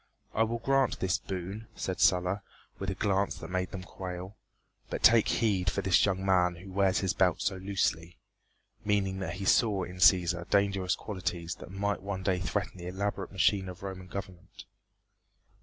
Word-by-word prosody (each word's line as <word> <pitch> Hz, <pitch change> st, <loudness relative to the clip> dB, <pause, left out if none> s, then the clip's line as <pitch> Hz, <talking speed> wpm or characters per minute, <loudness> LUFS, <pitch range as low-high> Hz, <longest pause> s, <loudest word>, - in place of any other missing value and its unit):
"I -, -, +1 dB
will 115 Hz, +1 st, +1 dB
grant 135 Hz, +3 st, +1 dB
this 95 Hz, -1 st, +1 dB
boon," 95 Hz, +4 st, -6 dB
said 95 Hz, -, -3 dB
Sulla, 90 Hz, +2 st, +3 dB, 0.4 s
with 95 Hz, -, -3 dB
a 95 Hz, -, -2 dB
glance 100 Hz, 0 st, +1 dB
that -, -, -9 dB
made 90 Hz, 0 st, -1 dB
them 95 Hz, -2 st, -7 dB
quail, 90 Hz, +1 st, -7 dB, 0.5 s
"but -, -, -4 dB
take 115 Hz, -1 st, +7 dB
heed 95 Hz, -6 st, +1 dB
for 100 Hz, -, -2 dB
this 90 Hz, -2 st, +4 dB
young 95 Hz, -1 st, -1 dB
man 90 Hz, -2 st, +3 dB
who 95 Hz, +3 st, -11 dB
wears 95 Hz, -1 st, +2 dB
his 95 Hz, -1 st, 0 dB
belt 90 Hz, -4 st, +2 dB
so 95 Hz, -2 st, -1 dB
loosely," 90 Hz, -3 st, -1 dB, 0.7 s
meaning 100 Hz, -2 st, 0 dB
that 90 Hz, -3 st, -3 dB
he 95 Hz, +1 st, -5 dB
saw 100 Hz, -3 st, +3 dB
in 90 Hz, +1 st, -7 dB
Cæsar 90 Hz, -2 st, +4 dB
dangerous 100 Hz, -2 st, +2 dB
qualities 90 Hz, -4 st, -4 dB
that -, -, -10 dB
might 100 Hz, +1 st, -2 dB
one 95 Hz, -1 st, -4 dB
day 95 Hz, -1 st, +1 dB
threaten 90 Hz, +1 st, -3 dB
the 85 Hz, -, -7 dB
elaborate 100 Hz, +1 st, -3 dB
machine 95 Hz, 0 st, +2 dB
of 90 Hz, +1 st, -10 dB
Roman 95 Hz, -1 st, -6 dB
government. 95 Hz, -2 st, -8 dB
95 Hz, 175 wpm, -30 LUFS, 90-100 Hz, 0.7 s, take